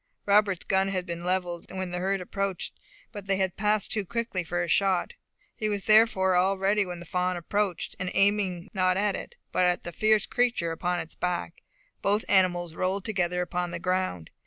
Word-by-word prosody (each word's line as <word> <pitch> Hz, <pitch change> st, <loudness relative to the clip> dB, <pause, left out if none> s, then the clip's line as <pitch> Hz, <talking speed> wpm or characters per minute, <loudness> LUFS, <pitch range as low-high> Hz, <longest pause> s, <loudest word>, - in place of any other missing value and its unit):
Robert's 200 Hz, -2 st, +3 dB
gun 190 Hz, 0 st, +2 dB
had 185 Hz, -2 st, -2 dB
been 170 Hz, -1 st, -5 dB
levelled, 180 Hz, -1 st, -2 dB
when 185 Hz, -1 st, -4 dB
the 180 Hz, -, -2 dB
herd 195 Hz, +1 st, 0 dB
appeared, 195 Hz, 0 st, -3 dB, 0.4 s
but 205 Hz, -3 st, -8 dB
they 195 Hz, -1 st, +2 dB
passed 210 Hz, +2 st, 0 dB
too 210 Hz, -1 st, 0 dB
quickly 225 Hz, -2 st, -2 dB
for 175 Hz, +1 st, -1 dB
a -, -, -3 dB
shot; 190 Hz, +1 st, +2 dB, 0.4 s
he 215 Hz, -, -2 dB
was 205 Hz, -2 st, -2 dB
therefore 215 Hz, -4 st, +5 dB
all 190 Hz, +2 st, +3 dB
ready 200 Hz, +1 st, +2 dB
when 175 Hz, -1 st, -6 dB
the 175 Hz, -, -9 dB
fawn 180 Hz, +1 st, -1 dB
approached, 195 Hz, +1 st, -2 dB
and 180 Hz, -1 st, -2 dB
aiming 195 Hz, -2 st, +2 dB
not 185 Hz, -2 st, +2 dB
at 205 Hz, 0 st, +1 dB
it, -, -, -8 dB, 0.2 s
but -, -, +2 dB
at 180 Hz, 0 st, +1 dB
the 175 Hz, -, -5 dB
fierce 215 Hz, +3 st, +3 dB
creature 235 Hz, -9 st, +1 dB
upon 175 Hz, +2 st, -1 dB
its 160 Hz, -, -7 dB
back, 175 Hz, -1 st, -3 dB, 0.4 s
both 205 Hz, +2 st, +1 dB
animals 175 Hz, -3 st, +2 dB
rolled 185 Hz, +3 st, -1 dB
together 180 Hz, -4 st, 0 dB
upon 180 Hz, 0 st, -2 dB
the 170 Hz, -, -4 dB
ground. 180 Hz, -, -2 dB
185 Hz, 190 wpm, -27 LUFS, 180-200 Hz, 0.4 s, therefore